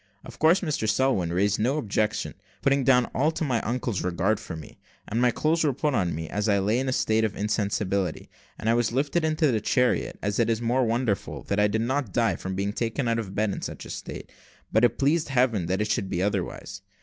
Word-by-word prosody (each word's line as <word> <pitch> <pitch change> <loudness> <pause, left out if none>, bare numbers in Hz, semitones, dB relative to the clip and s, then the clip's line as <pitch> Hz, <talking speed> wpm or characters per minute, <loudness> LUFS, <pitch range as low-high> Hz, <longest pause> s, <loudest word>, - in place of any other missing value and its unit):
Of - - -11
course, 165 +4 +5
Mr 150 - -1
Selwin 105 -8 +1
raised 95 +4 +1
no 130 +7 +1
objections, 105 -5 -1 0.3
putting 140 0 +3
down 125 -2 +4
all 145 +5 +2
to 160 - -3
my 125 -6 0
uncle's 120 -3 -2
regard 90 +4 0
for 85 - -7
me; 80 -1 -11 0.3
and 115 +3 -1
my 125 - +5
clothes 160 +7 +1
were 145 -3 +2
put 145 +3 -1
on 90 -9 0
me, 80 0 -5
as 105 +5 -1
I 100 - +4
lay 105 +5 +1
in 135 0 -1
a - - +1
state 110 -3 +1
of 110 -2 -1
insensibility, 100 -3 -1 0.3
and - - -5
I 115 - +4
was 120 -1 +1
lifted 145 +6 0
into 155 -2 +2
the 110 -3 0
chariot. 125 +2 +1
It 105 +3 +1
is 115 -1 +1
most 120 +1 +1
wonderful 115 -3 -1
that 100 - -1
I 105 - +5
did 110 +2 -1
not 130 -3 -1
die 115 -6 +2
from 95 +3 -5
being 100 +1 -1
thus - - -7
taken 115 +2 -1
out 115 0 +1
of 110 - -4
my 95 - -10
bed 105 0 0
in - - -5
such - - -6
a - - -8
state, - - -7 0.4
but 110 - +3
it 120 -2 +3
pleased 150 +3 +1
Heaven 125 -9 +1
that 95 +3 0
it 105 - 0
should 95 - -1
be 90 -1 -1
otherwise. 100 0 -3
110 Hz, 240 wpm, -26 LUFS, 100-130 Hz, 0.4 s, course